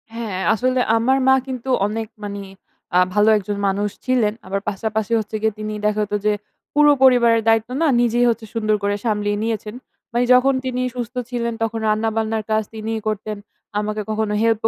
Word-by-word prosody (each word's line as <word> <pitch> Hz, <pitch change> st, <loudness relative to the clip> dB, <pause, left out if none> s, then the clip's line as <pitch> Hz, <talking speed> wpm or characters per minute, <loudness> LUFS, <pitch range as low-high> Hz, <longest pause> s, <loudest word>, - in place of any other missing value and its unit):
হ্যাঁ, 220 Hz, -5 st, -4 dB
আসলে 255 Hz, +3 st, +1 dB, 0.2 s
আমার 255 Hz, +4 st, +2 dB
মা 265 Hz, -, +7 dB
কিন্তু 260 Hz, 0 st, -5 dB, 0.2 s
অনেক 220 Hz, +1 st, -3 dB, 0.2 s
মানে 200 Hz, -1 st, -5 dB, 0.5 s
অ্যা 180 Hz, -, +4 dB
ভালো 210 Hz, +2 st, +4 dB
একজন 205 Hz, 0 st, -4 dB
মানুষ 200 Hz, +2 st, 0 dB, 0.2 s
ছিলেন। 245 Hz, -5 st, +2 dB
আবার 195 Hz, +1 st, -2 dB
পাশাপাশি 220 Hz, +2 st, -3 dB
হচ্ছে 215 Hz, 0 st, -5 dB
গিয়ে, 220 Hz, -1 st, +1 dB
তিনি 215 Hz, 0 st, -4 dB
দেখা 210 Hz, 0 st, +1 dB
হতো 210 Hz, 0 st, -2 dB
যে 210 Hz, -, +4 dB, 0.4 s
পুরো 295 Hz, 0 st, +6 dB
পরিবারের 235 Hz, -3 st, +5 dB
দায়িত্ব 225 Hz, 0 st, +3 dB
না 325 Hz, -, +4 dB
নিজেই 240 Hz, 0 st, +2 dB
হচ্ছে 230 Hz, -1 st, -2 dB
সুন্দর 215 Hz, -2 st, +1 dB
করে 205 Hz, 0 st, +1 dB
সামলিয়ে 205 Hz, -2 st, 0 dB
নিয়েছেন। 220 Hz, -1 st, -3 dB, 0.4 s
মানে 240 Hz, +2 st, +1 dB
যখন 260 Hz, +2 st, +5 dB
তিনি 255 Hz, -1 st, -2 dB
সুস্থ 245 Hz, 0 st, -5 dB
ছিলেন 235 Hz, -1 st, -2 dB
তখন 225 Hz, 0 st, -2 dB
রান্না-বান্নার 220 Hz, 0 st, 0 dB
কাজ 215 Hz, 0 st, +2 dB
তিনিই 220 Hz, +1 st, -3 dB
করতেন। 215 Hz, 0 st, -3 dB, 0.4 s
আমাকে 210 Hz, 0 st, -2 dB
কখনো 215 Hz, -1 st, -1 dB
হেল্প 225 Hz, -1 st, +2 dB
220 Hz, 175 wpm, -21 LUFS, 210-235 Hz, 0.5 s, মা